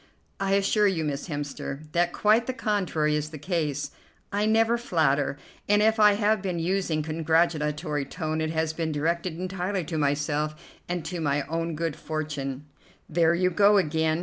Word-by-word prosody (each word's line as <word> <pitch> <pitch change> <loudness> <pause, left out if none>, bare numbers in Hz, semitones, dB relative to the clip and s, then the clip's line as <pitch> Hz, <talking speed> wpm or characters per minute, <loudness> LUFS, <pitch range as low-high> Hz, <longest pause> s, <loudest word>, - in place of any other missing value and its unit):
"I 195 0 0
assure 200 +1 +3
you, 175 -5 0
Miss 145 0 -3
Hemster, 145 -2 -5
that 175 +1 +2
quite 220 +5 +3
the 260 - -1
contrary 180 -9 0
is 150 0 -2
the 155 - -8
case. 150 -3 -2 0.4
I 205 +1 +1
never 225 +1 +3
flatter; 145 - +1 0.3
and 205 0 +5
if 220 +1 +3
I 210 -1 +7
have 210 0 +2
been 185 -3 -2
using 170 -2 0
a - - -5
congratulatory 155 -2 0
tone 155 +1 -3
it 160 - -1
has 160 0 -1
been 160 -1 -2
directed 165 +3 -1
entirely 185 +1 -2
to 160 0 -3
myself 150 +1 0 0.3
and 175 -2 -2
to 175 -2 -4
my 145 -1 +1
own 165 +2 -3
good 165 -1 -2
fortune." 145 -3 -4 0.4
"There 165 +1 +3
you 180 +1 +2
go 205 +3 +5
again. 160 -2 +1
165 Hz, 175 wpm, -26 LUFS, 150-190 Hz, 0.4 s, I